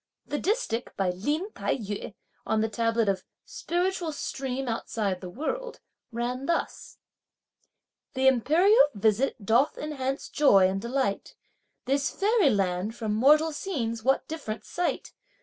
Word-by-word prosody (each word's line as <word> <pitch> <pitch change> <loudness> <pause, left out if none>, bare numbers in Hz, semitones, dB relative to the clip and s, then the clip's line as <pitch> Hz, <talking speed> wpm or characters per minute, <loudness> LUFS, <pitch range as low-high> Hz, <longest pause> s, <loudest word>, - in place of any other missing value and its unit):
The 290 - -3
distich 365 - -1
by 190 -2 +1
Lin 295 - -2
Tai - - -1
yü 205 -2 -6 0.3
on 220 0 0
the 220 - 0
tablet 230 0 +1
of 195 -2 0 0.2
"Spiritual 350 -1 -2
stream 270 -2 -4
outside 215 -4 -2
the 180 - -7
world," 475 - -4 0.3
ran 245 +3 -3
thus: 335 - -2 1.2
Th' 260 0 0
imperial 315 - +5
visit 215 +2 +1
doth 235 +7 +3
enhance 270 -3 -3
joy 200 -11 +5
and 195 +1 -2
delight. 235 -3 -2 0.5
This 275 +2 +1
fairy 415 -5 +3
land 195 0 0
from 220 -3 -2
mortal 300 +8 +4
scenes 250 - -3
what 270 +1 +2
diff'rent 280 -9 -6
sight! 350 0 -3
255 Hz, 130 wpm, -27 LUFS, 215-305 Hz, 1.2 s, imperial